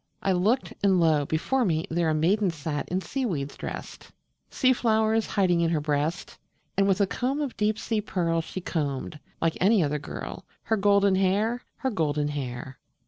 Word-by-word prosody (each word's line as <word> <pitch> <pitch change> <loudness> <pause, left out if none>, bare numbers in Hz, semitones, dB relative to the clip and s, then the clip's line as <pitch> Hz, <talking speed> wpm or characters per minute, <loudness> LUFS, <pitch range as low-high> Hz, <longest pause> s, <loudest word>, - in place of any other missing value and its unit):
I 195 - +2
looked, 205 +8 +1
and 195 -2 +4
lo! 155 -4 +3
before 250 +12 +1
me 160 -6 0
there 165 0 +1
A 155 - +1
maiden 190 +6 +2
sat 150 -2 -4
in 185 +2 -1
seaweeds 180 - -3
drest, - - -7 0.4
Sea 260 0 +3
flowers 220 -2 +2
hiding 180 -4 +2
in 165 - +2
her 165 -2 +1
breast, 150 +3 -2 0.4
And 195 0 +3
with 195 +1 +2
a - - +5
comb 260 +8 -2
of 285 -4 -3
deep 210 0 +1
sea 220 -1 -1
pearl 170 -5 0
She 185 +3 -7
combed, 150 -3 -3 0.2
like 165 -1 0
any 200 0 +5
other 150 0 -1
girl, 145 - -7 0.2
Her 220 - +1
golden 200 -1 +4
hair 205 +6 +1
her 265 - -2
golden 150 -6 0
hair. 130 -2 -5
180 Hz, 180 wpm, -26 LUFS, 155-215 Hz, 0.4 s, a